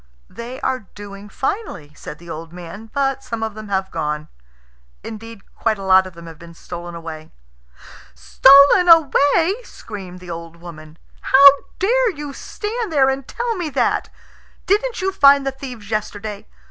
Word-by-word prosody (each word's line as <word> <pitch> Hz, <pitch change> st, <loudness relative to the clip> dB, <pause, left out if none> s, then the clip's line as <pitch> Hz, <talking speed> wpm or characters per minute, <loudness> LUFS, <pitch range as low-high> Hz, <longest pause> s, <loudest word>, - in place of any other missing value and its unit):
"They 240 Hz, +3 st, -8 dB
are 255 Hz, -6 st, -2 dB
doing 205 Hz, 0 st, -10 dB
finely," 300 Hz, -, -4 dB
said 150 Hz, -, -10 dB
the 170 Hz, -, -16 dB
old 165 Hz, 0 st, -8 dB
man; 180 Hz, +5 st, -10 dB
"but 270 Hz, -1 st, -1 dB
some 230 Hz, -1 st, -5 dB
of 220 Hz, -1 st, -3 dB
them 215 Hz, 0 st, -9 dB
have 190 Hz, -1 st, -2 dB
gone. 150 Hz, -1 st, -3 dB, 0.7 s
Indeed, 225 Hz, -1 st, -10 dB
quite 220 Hz, -2 st, -1 dB
a 195 Hz, -, -8 dB
lot 190 Hz, 0 st, +4 dB
of 185 Hz, -, -12 dB
them 170 Hz, 0 st, -12 dB
have 165 Hz, -2 st, -12 dB
been 170 Hz, 0 st, -13 dB
stolen 175 Hz, 0 st, -8 dB
away." 160 Hz, -2 st, -9 dB, 0.8 s
"Stolen 280 Hz, +7 st, +6 dB
away!" 330 Hz, -, +4 dB
screamed 190 Hz, -, -10 dB
the 180 Hz, -1 st, -9 dB
old 165 Hz, 0 st, -8 dB
woman. 165 Hz, -2 st, -12 dB, 0.2 s
"How 275 Hz, +1 st, +7 dB, 0.3 s
dare 485 Hz, +5 st, +2 dB
you 290 Hz, -1 st, -7 dB
stand 430 Hz, -, -5 dB
there 270 Hz, -3 st, +3 dB
and 265 Hz, -1 st, -5 dB
tell 475 Hz, -1 st, -3 dB
me 350 Hz, -4 st, -3 dB
that? -, -, 0 dB, 0.6 s
Didn't 425 Hz, +2 st, 0 dB
you 385 Hz, -, +1 dB
find 280 Hz, -6 st, +5 dB
the 270 Hz, -, 0 dB
thieves 250 Hz, -6 st, -10 dB
yesterday? 210 Hz, -1 st, -4 dB
220 Hz, 160 wpm, -20 LUFS, 175-280 Hz, 0.8 s, How